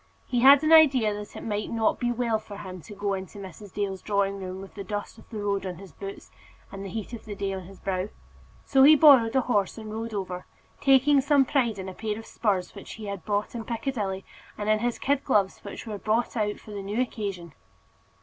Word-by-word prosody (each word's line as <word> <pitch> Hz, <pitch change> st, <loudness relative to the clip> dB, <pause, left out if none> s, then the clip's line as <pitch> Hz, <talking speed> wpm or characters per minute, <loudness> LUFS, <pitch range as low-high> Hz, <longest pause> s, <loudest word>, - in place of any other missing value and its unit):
He 245 Hz, -, 0 dB
had 275 Hz, +4 st, +8 dB
an 310 Hz, +1 st, +4 dB
idea 270 Hz, -9 st, +6 dB
that 205 Hz, 0 st, -8 dB
it -, -, -7 dB
might 210 Hz, -1 st, -2 dB
not 225 Hz, -1 st, +1 dB
be 240 Hz, -1 st, 0 dB
well 235 Hz, -2 st, 0 dB
for 205 Hz, -2 st, -10 dB
him 185 Hz, -3 st, -8 dB
to 205 Hz, -, -11 dB
go 200 Hz, 0 st, -1 dB
into 190 Hz, +1 st, -6 dB
Mrs. 195 Hz, +1 st, -10 dB
Dale's 195 Hz, -2 st, -3 dB
drawing 200 Hz, -1 st, 0 dB
room 185 Hz, 0 st, -6 dB
with 195 Hz, 0 st, -10 dB
the 200 Hz, -, -6 dB
dust 205 Hz, +1 st, -5 dB
of -, -, -18 dB
the 225 Hz, -, -6 dB
road 200 Hz, -1 st, 0 dB
on 185 Hz, -2 st, -4 dB
his 190 Hz, +1 st, -12 dB
boots, 195 Hz, 0 st, -9 dB, 0.4 s
and 195 Hz, 0 st, -7 dB
the 195 Hz, -, -6 dB
heat 220 Hz, +4 st, -5 dB
of 230 Hz, -, -8 dB
the 210 Hz, -2 st, -6 dB
day 195 Hz, -1 st, -2 dB
on 190 Hz, -2 st, -6 dB
his 195 Hz, 0 st, -13 dB
brow. 190 Hz, +1 st, -2 dB, 0.6 s
So 270 Hz, -, +4 dB
he 295 Hz, +3 st, +9 dB
borrowed 270 Hz, -6 st, +7 dB
a 265 Hz, -, +5 dB
horse 210 Hz, -5 st, 0 dB
and 215 Hz, -1 st, -7 dB
rode 225 Hz, 0 st, -4 dB
over, 185 Hz, -2 st, -4 dB, 0.3 s
taking 275 Hz, +1 st, +5 dB
some 280 Hz, 0 st, +4 dB
pride 245 Hz, -6 st, +1 dB
in 190 Hz, 0 st, -6 dB
a 190 Hz, -, -6 dB
pair 215 Hz, +1 st, -3 dB
of 225 Hz, -, -9 dB
spurs 195 Hz, -5 st, -1 dB
which -, -, -9 dB
he 220 Hz, -, -8 dB
had 200 Hz, -3 st, -5 dB
bought 205 Hz, -1 st, -1 dB
in 235 Hz, -2 st, -4 dB
Piccadilly, 220 Hz, -5 st, -3 dB, 0.3 s
and 210 Hz, -, -4 dB
in 215 Hz, 0 st, +3 dB
his 240 Hz, +1 st, -1 dB
kid 280 Hz, 0 st, 0 dB
gloves, 205 Hz, -7 st, +2 dB
which 200 Hz, -, -8 dB
were 210 Hz, -3 st, -5 dB
brought 220 Hz, +5 st, 0 dB
out 215 Hz, -3 st, +1 dB
new 210 Hz, -, -3 dB
for 215 Hz, -, -13 dB
the 200 Hz, 0 st, -5 dB
occasion. 200 Hz, -, -3 dB
210 Hz, 235 wpm, -27 LUFS, 195-235 Hz, 0.6 s, he